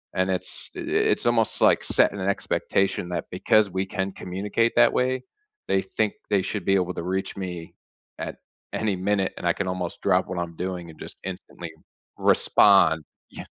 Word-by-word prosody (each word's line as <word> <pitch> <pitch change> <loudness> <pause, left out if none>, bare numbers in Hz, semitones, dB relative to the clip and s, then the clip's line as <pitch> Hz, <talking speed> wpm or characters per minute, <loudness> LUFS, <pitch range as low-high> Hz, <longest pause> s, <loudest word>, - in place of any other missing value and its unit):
And 95 +1 +1
it's 90 - -3
it - - -6
it's - - +2
almost, 115 -2 +2
like, - - +5
setting 100 - +3
an 95 +1 0
expectation 95 -2 0
that 85 -1 -3
because 110 -2 +3
we 95 +1 -2
can 95 0 -3
communicate 100 +6 -1
that 120 0 +6
way, 130 0 0 0.4
they 95 - +2
think 105 +2 -1 0.2
they 100 -2 +3
should 100 0 -4
be 95 - +3
able 90 -1 0
to - - -4
reach 95 +2 -3
me 90 -3 -6 0.4
at - - -5 0.4
any 105 -3 0
minute, 95 +1 0
and - - -6
I 85 - +4
can 100 - -3
almost 90 -2 -4
drop - - +2
what 95 - -4
I'm 85 -1 -4
doing 90 -1 -4
and 80 - -13
just - - -8
instantly 85 -2 -7 0.5
respond 80 -6 +5 0.3
yeah - - -8
95 Hz, 180 wpm, -25 LUFS, 90-100 Hz, 0.5 s, that